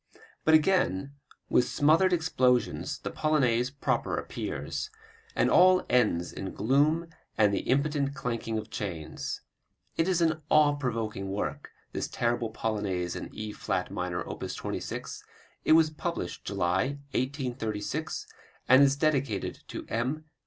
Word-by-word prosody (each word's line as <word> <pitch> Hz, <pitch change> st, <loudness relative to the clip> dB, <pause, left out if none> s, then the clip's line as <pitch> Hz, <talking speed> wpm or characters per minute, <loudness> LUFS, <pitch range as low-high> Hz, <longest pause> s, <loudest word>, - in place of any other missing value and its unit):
But 160 Hz, -, +6 dB
again 155 Hz, -, +2 dB, 0.3 s
with 125 Hz, -, +3 dB
smothered 160 Hz, +6 st, +4 dB
explosions 130 Hz, -8 st, +1 dB
the -, -, -5 dB
Polonaise 125 Hz, -6 st, +2 dB
proper 140 Hz, 0 st, -1 dB
appears, 430 Hz, -, -4 dB, 0.5 s
and -, -, +3 dB
all 185 Hz, 0 st, +6 dB
ends 105 Hz, -9 st, +2 dB
in 95 Hz, -, -6 dB
gloom 145 Hz, +7 st, +3 dB, 0.3 s
and 105 Hz, -2 st, +4 dB
the -, -, +1 dB
impotent 140 Hz, +1 st, +1 dB
clanking 115 Hz, -3 st, -2 dB
of 110 Hz, 0 st, -6 dB
chains. 80 Hz, -7 st, -4 dB, 0.6 s
It 165 Hz, -, +2 dB
is 185 Hz, -2 st, +2 dB
an 160 Hz, -2 st, +2 dB
awe 150 Hz, -1 st, +5 dB
provoking 115 Hz, -8 st, -3 dB
work, 100 Hz, +2 st, -3 dB, 0.2 s
this -, -, -2 dB
terrible 120 Hz, -1 st, 0 dB
Polonaise 100 Hz, -6 st, -2 dB
in -, -, -5 dB
E 110 Hz, 0 st, -5 dB
flat 95 Hz, -3 st, -2 dB
minor, 90 Hz, -1 st, -3 dB
op. -, -, -7 dB
26; -, -, -5 dB, 0.4 s
it -, -, +6 dB
was 160 Hz, -1 st, +5 dB
published 150 Hz, -, -4 dB
July, 95 Hz, +11 st, 0 dB
1836, 125 Hz, -1 st, -2 dB, 0.4 s
and 130 Hz, +2 st, +7 dB
is 140 Hz, -1 st, +5 dB
dedicated 140 Hz, -8 st, 0 dB
to -, -, -6 dB
M. 130 Hz, +7 st, -2 dB
130 Hz, 130 wpm, -29 LUFS, 105-155 Hz, 0.6 s, and